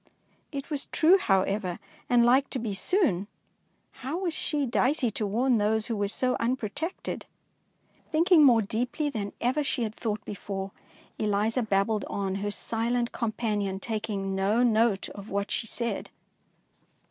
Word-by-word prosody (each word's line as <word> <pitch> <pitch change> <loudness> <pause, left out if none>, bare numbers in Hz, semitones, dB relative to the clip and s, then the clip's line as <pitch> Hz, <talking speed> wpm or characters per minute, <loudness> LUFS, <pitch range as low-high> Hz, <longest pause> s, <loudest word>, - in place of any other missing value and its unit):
It 280 +1 -6
was 290 -2 -3
true, 355 +5 +5
however, 195 - +1 0.3
and 240 -1 +5
like 265 +3 +4
to - - -3
be 225 -4 -3
soon. 205 - +1 0.7
How 270 +6 -3
was 360 -3 -1
she. 295 -3 0
Dicey, 250 0 +1
to 210 0 -2
warn 240 +3 +2
those 215 +1 +1
who 230 - -2
were 205 -1 0
so 255 +5 0
unprotected? 255 - -3 0.8
Thinking 330 0 +5
more 235 -5 +6
deeply 250 +8 -1
than 205 -5 -3
ever 260 +5 +1
she 265 -3 -1
had 215 -1 -3
thought 215 -2 -3
before, 195 -1 -5 0.5
Eliza 215 +3 +1
babbled 210 0 +1
on, 195 -1 -2
her 205 - -1
silent 235 +3 -1
companion 210 -4 -1
taking 210 -3 -3
no 200 +5 +2
note 225 -4 +3
of 200 +1 -10
what 200 +1 -2
she 225 - -2
said. 235 +1 -3
225 Hz, 145 wpm, -28 LUFS, 205-260 Hz, 0.8 s, more